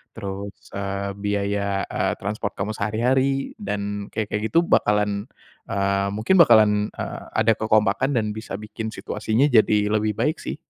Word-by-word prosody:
terus, 100 -1 -6 0.2
eee, 100 0 -3
biaya, 100 -1 -1
eee, - - -1
transpor 100 +1 -3
kamu 105 +3 -3
sehari-hari, 130 +6 0
dan 100 0 -3
kayak-kayak 105 -1 -2
gitu 170 - +4
bakalan, 105 -7 +1 0.4
eee 100 0 0
mungkin 120 - +2
bakalan, 105 -7 +6
eee, - - -5
ada 110 0 +4
kekompakan 110 +4 +2
dan 110 -3 0
bisa 110 -2 -6
bikin 105 +2 -6
situasinya 115 +6 0
jadi 105 -2 +4
lebih 110 -1 +1
baik 150 +9 0
sih. - - -5
105 Hz, 140 wpm, -23 LUFS, 100-110 Hz, 0.4 s, bakalan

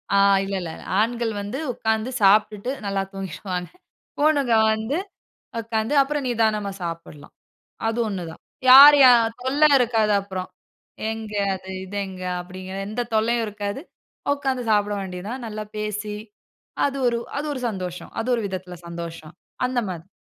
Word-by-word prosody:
ஆ - - +5 0.3
இல்ல, 195 0 -3
இல்ல. 165 -2 -5 0.3
ஆண்கள் 230 0 0
வந்து 205 +8 -5
உட்கார்ந்து 220 +2 -1
சாப்பிட்டுட்டு 210 +4 +3
நல்லா 195 -1 0
தூங்கிருவாங்க. 185 -1 -5 0.5
பொண்ணுக 290 -4 +3 0.2
வந்து 220 +7 -2 0.6
உட்கார்ந்து 225 +3 -1
அப்புறம் 285 0 -1
நிதானமா 215 -4 +1
சாப்பிடலாம். 165 -3 -7 0.5
அது 225 +1 -1
ஒன்னு 195 -4 -3
தான். - - -14 0.3
யார் 280 +3 +11
யார் 230 -2 +5
தொல்ல 275 +3 -1 0.2
இருக்காது 225 -4 +2
அப்புறம். 190 -2 -6 0.6
எங்க 220 -1 -6 0.2
அது 190 0 -11
இது 200 +2 -6
எங்க 185 -1 -9 0.2
அப்படிங்கிற 185 +1 -8
எந்த 215 +4 -2
தொல்லையும் 230 +1 +2
இருக்காது. 205 +4 -4 0.5
உக்காந்து 265 -3 -2
சாப்பிட 205 0 +2
வேண்டியது 185 0 -6
தான். 250 +1 -5
நல்லா 215 -1 -5
பேசி 210 0 -3 0.7
அது 275 -1 -1
ஒரு, 235 -1 +1 0.2
அது 295 - -2
ஒரு 260 - -5
சந்தோஷம். 180 -4 -6
அது 235 - -6
ஒரு 235 - -2
விதத்தில 185 -2 -6
சந்தோஷம், 170 -1 -8 0.3
அந்த 250 -1 0
மாரி. 175 +1 -7
215 Hz, 140 wpm, -23 LUFS, 190-240 Hz, 0.7 s, யார்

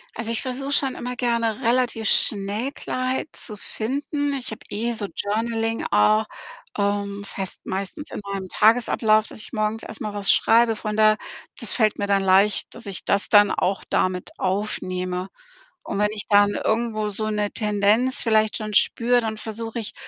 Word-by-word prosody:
Also, 230 0 -3
ich 230 - 0
versuche 270 +2 -3
schon 270 -2 +1
immer 250 +1 -5
gerne, 235 -1 0
relativ 235 -2 +1
schnell 210 +6 +1
Klarheit 255 +3 -3
zu 215 - -7
finden. 280 +7 -3
Ich 260 -4 -4
habe 220 - -7
eh 230 +3 -2
so 210 -3 -3
Journaling 225 +2 -1
auch, 215 +1 +4 0.5
ähm, 200 0 -1
fest 195 -1 -6
meistens 200 - -5
in - - -5
meinem 190 -2 -4
Tagesablauf, 220 -1 +3
dass - - -10
ich 215 - -9
morgens 215 0 -1
erst 220 - -9
mal 210 -1 -3
was 205 -1 0
schreibe. 230 0 +4
Von 210 0 -4
daher, 215 -1 +5 0.4
das - - -1
fällt 215 -3 +2
mir 200 - -2
dann 195 -1 +2
leicht, 195 +2 +3
dass 230 -3 -9
ich 195 - -7
das 200 - +1
dann 205 -1 +6
auch 195 +1 0
da 185 - +2
mit 180 -1 -7
aufnehme. 185 -2 -2 0.5
Und - - -4
wenn 210 0 +2
ich 210 - -4
dann 205 0 +5
irgendwo 220 -1 -1
so 215 +2 -3
'ne 210 -1 0
Tendenz 210 +4 +1
vielleicht 220 -2 +2
schon 215 -1 -5
spüre, 245 +1 +3
dann 220 -1 -3
versuche 225 +2 -5
ich 215 - -5
215 Hz, 175 wpm, -23 LUFS, 205-235 Hz, 0.5 s, dann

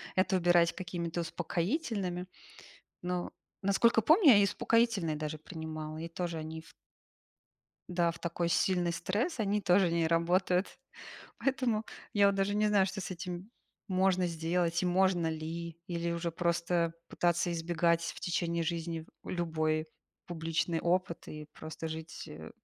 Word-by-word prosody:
это 190 +1 +3
убирать 175 -1 +4
какими-то 175 -2 -3
успокоительными, 180 - -2 0.8
но, 180 0 -2 0.3
насколько 225 +4 +4
помню, 315 - +6
я 215 - +8
и 200 - +5
успокоительные 205 -5 +2
даже 155 0 -4
принимала, 155 -1 -6
и 165 +1 -5
тоже 170 0 -3
они 160 +1 -6
ф 160 - -17 1.2
да, 175 -1 +2
в 170 - -12
такой 170 0 -1
сильный 180 -1 +2
стресс, 205 - -1
они 210 -1 +1
тоже 180 -2 +4
не 165 -1 +2
работают. 180 +3 +1 0.6
Поэтому, 250 -5 0 0.3
я 205 -1 +5
вот 200 - +3
даже 195 +1 +1
не 210 0 +3
знаю, 200 -2 +4
что 195 +1 -4
с - - -5
этим 180 +2 -6 0.4
можно 185 -1 +2
сделать 170 +1 0
и - - +1
можно 180 -2 +3
ли, 165 +1 -5
или 170 -1 -2
уже 170 0 -2
просто 170 0 0 0.2
пытаться 175 0 +1
избегать 170 0 +1
в - - -9
течение 170 -1 0
жизни 165 -1 -3 0.2
любой 155 -2 -1 0.4
публичный 165 0 -1
опыт 175 0 0
и 155 0 -8
просто 160 +1 -6
жить, 160 0 -7
э 80 +1 -9
175 Hz, 145 wpm, -32 LUFS, 165-190 Hz, 1.2 s, я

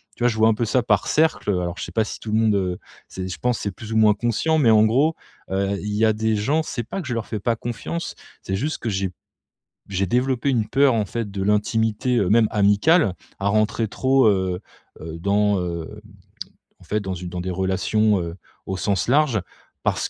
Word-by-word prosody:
tu - - -5
vois, 120 - +5
je 110 - -3
vois 110 +1 +5
un 110 - +2
peu 120 - -1
ça 125 +3 +2
par - - +2
cercle. 160 -8 +1
Alors, 90 -2 -2
je - - -4
sais - - -7
pas 110 - +1
si - - -7
tout 110 - -6
le 110 - +2
monde, 110 -2 +3
heu, 90 -2 -1 0.3
c'est, 95 0 -6
je 95 - -5
pense 125 -2 0
c'est 100 - -2
plus 110 +3 -8
ou - - +1
moins 105 -1 +5
conscient. 120 +9 0
Mais 115 -6 +5
en 110 0 +6
gros, 140 +9 +2 0.4
heu, 100 +1 0
il 105 0 -4
y 110 +1 +3
a 110 - +3
des 110 +1 0
gens, 140 +10 +1
c'est 120 - -4
pas 195 - -5
que - - -8
je 125 - -2
leur 115 - -3
fais 110 - -4
pas 115 +3 0
confiance, 120 +9 -5 0.3
c'est 95 - -2
juste 150 +10 -2
que 115 - -3
j'ai 95 -2 -1 0.8
j'ai 95 0 -1
développé 125 +4 +1
une 115 -5 0
peur 135 +3 +4
en 105 -3 0
fait 115 +1 -4
de 100 -1 -4
l'intimité, 110 +4 +1
heu, 100 -5 +1
même 110 0 +5
amicale, 105 - +3 0.3
à 100 - +1
rentrer 110 +1 +1
trop, 130 +1 +2
heu, 95 -3 0 0.4
heu, 80 +1 -7
dans, 100 +1 +2
hem, 85 -2 -3 1.0
en - - -15
fait 105 - -1
dans 95 -1 -4
une 90 0 -6
dans 90 0 -5
des 95 - -4
relations, 95 +2 +1
heu, 85 0 -5 0.3
au 95 - -2
sens 100 -1 0
large. 135 -5 +3 0.4
Parce - - 0
105 Hz, 230 wpm, -22 LUFS, 95-120 Hz, 1.0 s, en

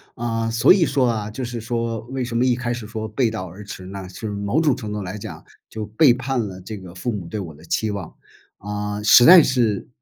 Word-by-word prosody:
啊， 115 -1 -2
所 115 +9 +5
以 180 -4 +3
说 135 -3 +1
啊， 110 -3 -2
就 130 +4 -5
是 120 -1 -5
说 115 -1 -2
为 130 -1 -3
什 120 -1 -5
么 120 - +2
一 125 -2 +3
开 120 -1 -2
始 115 -3 -7
说 110 -1 -5
背 115 +2 0
道 95 -4 -5
而 95 +5 -11
驰 95 -2 -9
呢， 95 0 -7
就 90 - -14
是 - - -3
某 100 +9 -1
种 145 -5 +3
程 105 -4 -6
度 105 - -3
来 95 +2 -5
讲 - - -9 0.3
就 110 -1 -5
背 120 +5 +4
叛 130 +1 -2
了 95 -1 -9
这 105 +3 -7
个 90 -2 -11
父 105 +7 -3
母 95 -5 -5
对 105 +5 -5
我 85 -5 -7
的 75 - -17
期 110 +5 -1
望。 100 -5 -6 0.4
啊， 105 0 -4
实 120 +3 +8
在 175 0 +10
是， 115 -6 0
110 Hz, 270 characters per minute, -22 LUFS, 100-120 Hz, 0.4 s, 在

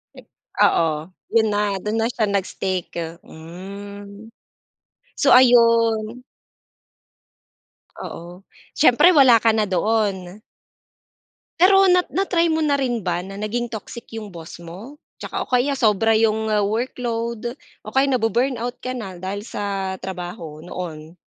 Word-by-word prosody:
Ik - - -14 0.4
oo, 160 -2 +2 0.4
yun 220 -1 +4
na, 205 0 +1 0.2
dun 210 +1 -2
na 225 - +1
siya 230 -2 -1
nag-stick, 190 -2 -3 0.3
hmm. 200 +5 -10 0.8
So, - - +2
ayun. 230 -2 +4 1.8
Oo, 175 +3 -9 0.3
siyempre 305 +5 +5
wala 260 -5 +7
ka 225 0 +2
na 220 - +2
doon. 200 0 -1 1.2
Pero 385 +2 +6
na 360 0 +4
na-try 340 -2 +1
mo 320 - +1
na 300 -2 +2
rin 255 -4 -1
ba 175 -3 -2
na 195 +1 -9
naging 235 +3 -3
toxic 230 +1 -7
'yong 225 -2 -6
boss 170 -3 -10
mo? 195 - -11 0.2
Tsaka - - -6
o - - -4
kaya 250 +3 +1
sobra 225 -4 +2
'yong 220 0 +2 0.2
workload, 235 +1 -3 0.3
o - - -6
kaya 270 +1 +4
na-bu-burnout 245 +1 0
ka 255 - -3
na 215 -7 -6
dahil 190 +3 -5
sa 195 -3 -3
trabaho 175 -4 -7
noon? 165 -1 -8
220 Hz, 125 wpm, -21 LUFS, 190-245 Hz, 1.8 s, wala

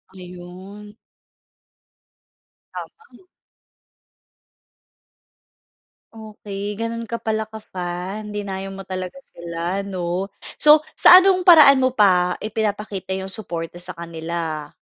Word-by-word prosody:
Ayun. 185 +3 -12 1.8
Tama. 445 -4 -12 2.9
Okey 210 -2 -7
gano'n 230 0 -3
ka 230 0 -5
pala 220 0 -2
ka-fan. 200 -1 -7
Dinayo 195 -2 -5
mo 195 -1 -10
talaga 185 +6 -6
sila, 170 -3 -5
'no? 185 0 -4 0.2
So, 300 +1 +6 0.2
sa 360 - +9
anong 375 -1 +2
paraan 295 -7 +7
mo 255 - +2
pa 180 -6 +2
ipinapakita 210 -3 -4
'yong 190 - -6
suporta 175 -6 -6
sa 175 0 -5
kanila? 165 -2 -6
195 Hz, 95 wpm, -21 LUFS, 180-220 Hz, 2.9 s, sa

